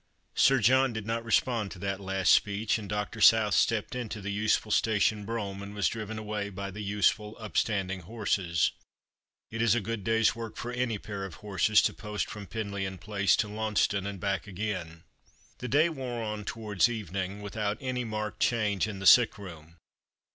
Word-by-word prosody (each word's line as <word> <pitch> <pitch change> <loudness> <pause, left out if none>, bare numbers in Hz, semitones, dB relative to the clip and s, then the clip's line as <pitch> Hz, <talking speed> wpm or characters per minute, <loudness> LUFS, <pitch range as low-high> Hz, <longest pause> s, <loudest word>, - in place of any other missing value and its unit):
Sir 135 - +5
John 130 +2 +4
did 110 -2 -5
not 115 +1 -2
respond 115 -2 +1
to 95 - -9
that 95 +1 -3
last 95 -3 +2
speech, 105 +2 +2
and 105 -2 -8
Pr. 105 +1 -3
South 105 0 +6
stepped 115 0 +1
into 120 -4 -4
the 100 0 -4
nsefnl 105 0 +1
station 105 -1 +2
brongham 100 -4 -4
and 100 +1 -8
was 105 - +2
driven 110 -1 -4
away 105 -1 -3
by 100 0 -6
the 100 - -9
nsefnl 105 +2 0
npstanding 100 -3 -1
horses. 95 -4 0 0.8
It 115 +1 -3
is 115 -1 +4
a - - +2
good 110 0 -4
day's 115 +1 +3
work 115 -1 -7
for 120 - -4
any 125 -3 -1
pair 100 -1 -6
of 95 -4 -7
horses 105 +1 +3
to - - +1
post 105 -1 -4
from 105 -2 -8
Penlyon 100 -3 -4
Place 100 -2 +2
to 105 - 0
Lannceston 105 -2 0
and 100 -1 -5
back 100 0 -2
again. 90 -5 -4 0.6
The 125 - -4
day 145 +6 +4
wore 130 -7 -4
on 105 -1 -4
towards 110 -1 +1
evening 100 -2 -4
without 105 0 -2
any 130 -1 -2
marked 110 -2 -4
change 110 -4 +1
in 105 -2 -5
the 95 - -6
sick 120 +2 +7
room. 85 -4 -11
105 Hz, 185 wpm, -29 LUFS, 100-115 Hz, 0.8 s, sick